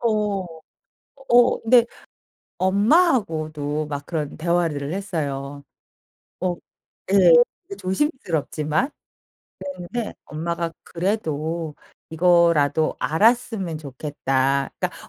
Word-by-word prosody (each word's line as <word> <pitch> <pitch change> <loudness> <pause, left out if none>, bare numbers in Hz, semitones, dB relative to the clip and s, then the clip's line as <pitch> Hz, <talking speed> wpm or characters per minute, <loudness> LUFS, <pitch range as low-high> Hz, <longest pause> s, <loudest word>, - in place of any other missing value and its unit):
어. 210 -4 0 0.9
어 240 0 +5
근데 235 +1 +5 0.7
엄마하고도 185 - +2
막 145 -1 -5
그런 155 -4 -3
대화를 160 -3 0
했어요. 145 -7 -4 0.8
어 180 -1 0 0.6
예. 185 -4 +7 0.3
이게 200 - -9
조심스럽지만 185 - -1 0.7
그랬는데 190 +4 -5
엄마가 170 +2 -3
"그래도 165 -4 -2 0.4
이거라도 165 -3 +3
알았으면 205 -2 +1
좋겠다." 135 -1 -1
그러니까 - - -4
170 Hz, 210 characters per minute, -23 LUFS, 150-200 Hz, 0.9 s, 예